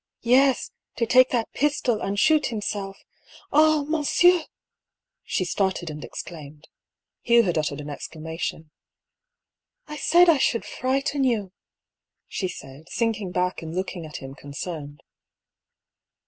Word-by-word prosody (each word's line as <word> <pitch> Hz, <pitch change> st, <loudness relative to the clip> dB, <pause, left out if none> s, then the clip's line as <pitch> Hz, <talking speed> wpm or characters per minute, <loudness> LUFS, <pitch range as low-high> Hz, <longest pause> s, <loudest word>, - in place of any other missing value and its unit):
yes, 260 Hz, +2 st, +3 dB, 0.2 s
to 235 Hz, -, 0 dB
take 255 Hz, +2 st, +5 dB
that 235 Hz, -3 st, -1 dB
pistol 270 Hz, -6 st, 0 dB
and 200 Hz, +1 st, -2 dB
shoot 310 Hz, +5 st, +4 dB
himself! 205 Hz, -3 st, -4 dB, 0.6 s
Ah! 310 Hz, 0 st, +5 dB
mon 305 Hz, +1 st, -1 dB
sieur! 350 Hz, +2 st, +4 dB, 0.4 s
" -, -, -63 dB, 0.3 s
she 185 Hz, -, -1 dB
started 185 Hz, -2 st, -1 dB
and 150 Hz, 0 st, -8 dB
exclaimed. 155 Hz, -2 st, -9 dB, 0.5 s
Hugh 235 Hz, 0 st, +5 dB
had 175 Hz, -5 st, 0 dB
uttered 150 Hz, -2 st, -1 dB
an 145 Hz, 0 st, -7 dB
exclamation. 160 Hz, +1 st, -6 dB, 1.1 s
I 300 Hz, 0 st, -7 dB
said 350 Hz, +4 st, +5 dB
I 320 Hz, -5 st, +5 dB
should 230 Hz, -3 st, +1 dB
frighten 270 Hz, +2 st, -1 dB
you! 220 Hz, -7 st, 0 dB, 0.4 s
" -, -, -67 dB, 0.3 s
she 190 Hz, -, -3 dB
said, 155 Hz, -1 st, -10 dB
sinking 220 Hz, -4 st, -1 dB
back 180 Hz, 0 st, -1 dB
and 160 Hz, 0 st, -7 dB
looking 185 Hz, -2 st, -3 dB
at 150 Hz, -, -7 dB
him 135 Hz, 0 st, -9 dB
concerned. 145 Hz, +1 st, -7 dB
205 Hz, 135 wpm, -24 LUFS, 160-270 Hz, 1.1 s, take